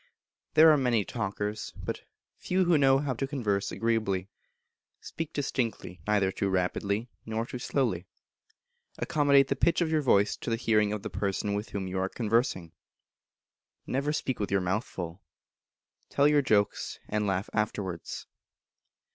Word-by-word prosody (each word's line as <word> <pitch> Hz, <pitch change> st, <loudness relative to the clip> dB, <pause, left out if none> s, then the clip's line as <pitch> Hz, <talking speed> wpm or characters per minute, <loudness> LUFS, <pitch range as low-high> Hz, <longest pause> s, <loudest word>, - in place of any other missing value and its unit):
There 160 Hz, +1 st, +9 dB
are 150 Hz, -, +5 dB
many 120 Hz, -6 st, +2 dB
talkers, 105 Hz, +2 st, -3 dB
but -, -, -5 dB, 0.3 s
few 185 Hz, 0 st, 0 dB
who 175 Hz, -1 st, +4 dB
know 135 Hz, -2 st, +5 dB
how 140 Hz, -1 st, -1 dB
to 135 Hz, +3 st, -3 dB
converse 110 Hz, -9 st, -1 dB
agreeably. 110 Hz, -5 st, 0 dB, 0.7 s
Speak 165 Hz, -1 st, -6 dB
distinctly, 120 Hz, -, -3 dB
neither 100 Hz, -3 st, +2 dB
too 100 Hz, +1 st, -1 dB
rapidly 100 Hz, +4 st, 0 dB, 0.2 s
nor 110 Hz, +1 st, -2 dB
too 125 Hz, -, -6 dB
slowly. 115 Hz, -10 st, -1 dB, 0.9 s
Accommodate 140 Hz, -2 st, +3 dB
the 135 Hz, -, +1 dB
pitch 165 Hz, +5 st, +2 dB
of 165 Hz, -2 st, +1 dB
your 155 Hz, -1 st, +3 dB
voice 105 Hz, -7 st, +3 dB
to -, -, -5 dB
the 115 Hz, -, +2 dB
hearing 110 Hz, -3 st, +2 dB
of 105 Hz, -2 st, -3 dB
the -, -, -5 dB
person 100 Hz, +2 st, -1 dB
with 105 Hz, +2 st, -3 dB
whom 100 Hz, -2 st, -3 dB
you 95 Hz, 0 st, -2 dB
are 95 Hz, 0 st, 0 dB
conversing. 110 Hz, -7 st, 0 dB, 1.1 s
Never 140 Hz, +3 st, -1 dB
speak 130 Hz, -4 st, -2 dB
with 100 Hz, -, -1 dB
your 100 Hz, -, +3 dB
mouth 95 Hz, +6 st, 0 dB
full. 90 Hz, +1 st, -7 dB, 0.9 s
Tell 140 Hz, +1 st, +4 dB
your 150 Hz, -1 st, +4 dB
jokes, 105 Hz, -6 st, +1 dB
and 105 Hz, 0 st, -1 dB
laugh 95 Hz, +1 st, 0 dB
afterwards. 100 Hz, -5 st, -3 dB
110 Hz, 155 wpm, -29 LUFS, 100-135 Hz, 1.1 s, There